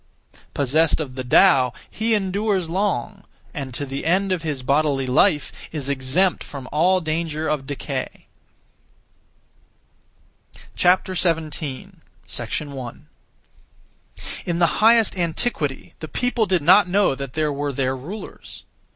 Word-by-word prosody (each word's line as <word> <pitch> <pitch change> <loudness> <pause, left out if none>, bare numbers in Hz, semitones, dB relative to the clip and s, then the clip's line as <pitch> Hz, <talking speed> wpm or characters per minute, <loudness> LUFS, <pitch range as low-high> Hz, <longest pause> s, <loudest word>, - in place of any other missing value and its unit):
Possessed 150 +4 +2
of 145 -5 -4
the 130 0 -5
Tao, 130 -2 +5
he 225 +1 0
endures 195 -3 -1
long; 190 -8 -1 0.3
and 135 -2 -5
to 145 - -3
the 135 0 -5
end 190 +4 +1
of 180 -3 0
his 150 -5 -4
bodily 140 0 +1
life, 150 +4 +2 0.2
is 145 -3 -3
exempt 140 +8 +1
from 135 -3 -8
all 180 +5 +3
danger 160 -1 -2
of 150 -3 -2
decay. 145 - -5 2.5
17. 175 -3 +2 1.2
1. 130 -4 -8 1.4
In 170 -1 0
the 170 - +4 0.2
highest 225 -1 +5
antiquity, 165 - -2
(the 155 - -6
people) 245 +4 0
did 180 -5 +1
not 185 +3 +6
know 200 -4 +3
that 135 -1 -6
there 155 -2 0
were 145 +1 -2
(their 130 -1 -1
rulers). 170 +12 -9
155 Hz, 120 wpm, -22 LUFS, 140-185 Hz, 2.5 s, not